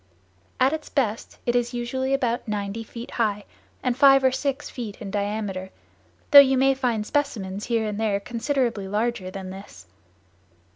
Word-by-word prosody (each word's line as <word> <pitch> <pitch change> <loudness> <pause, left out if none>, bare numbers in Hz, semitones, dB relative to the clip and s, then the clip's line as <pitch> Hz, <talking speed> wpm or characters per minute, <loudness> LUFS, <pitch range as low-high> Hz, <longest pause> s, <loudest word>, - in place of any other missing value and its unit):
At 265 +3 +4
its 315 -1 -5
best 230 -6 -2
it 240 - +1
is 245 0 0
usually 260 +2 -2
about 245 -4 0
ninety 205 +1 -3
feet 230 +2 -9
high 210 -3 -1 0.4
and 250 -2 +1
five 270 0 +6
or 260 - +5
six 275 +1 -2
feet 225 -5 -7
in 205 -4 -7
diameter, 200 -2 -3 0.6
though 285 - +12
you 270 -1 +6
may 270 +1 +4
find 245 -5 -1
specimens 210 -9 -2
here 230 -2 0
and 210 0 -4
there 210 -3 +1
considerably 235 -2 -1
larger 210 -1 -1
than 185 0 -7
this. 190 - -11
230 Hz, 160 wpm, -24 LUFS, 205-260 Hz, 0.6 s, though